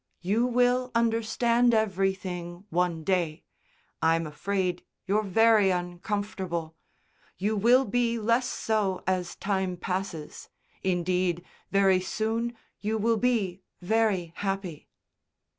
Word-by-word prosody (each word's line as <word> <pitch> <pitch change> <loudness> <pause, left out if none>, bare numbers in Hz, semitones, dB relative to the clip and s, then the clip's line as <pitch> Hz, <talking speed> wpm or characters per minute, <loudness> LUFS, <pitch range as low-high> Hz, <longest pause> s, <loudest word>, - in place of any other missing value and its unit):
"You 220 +7 +2
will 250 +1 +2
understand 230 +1 +2
everything 190 -3 -1
one 170 -1 0
day. 170 -4 0 0.6
I'm 165 0 +3
afraid 180 +4 -2 0.2
you're 200 +2 +2
very 215 0 +4
uncomfortable. 180 -2 -3 0.6
You 210 +3 0
will 240 +6 +4
be 235 +2 +1
less 230 +3 +1
so 205 -7 -1
as 185 -1 -1
time 190 -2 -1
passes. 180 -4 -5 0.3
Indeed, 180 -1 0 0.2
very 195 -2 +4
soon 225 +4 -2 0.2
you 215 +2 -1
will 225 +1 +2
be 210 -6 0 0.2
very 190 -3 +1
happy." 195 -5 -4
195 Hz, 105 wpm, -27 LUFS, 180-225 Hz, 0.6 s, very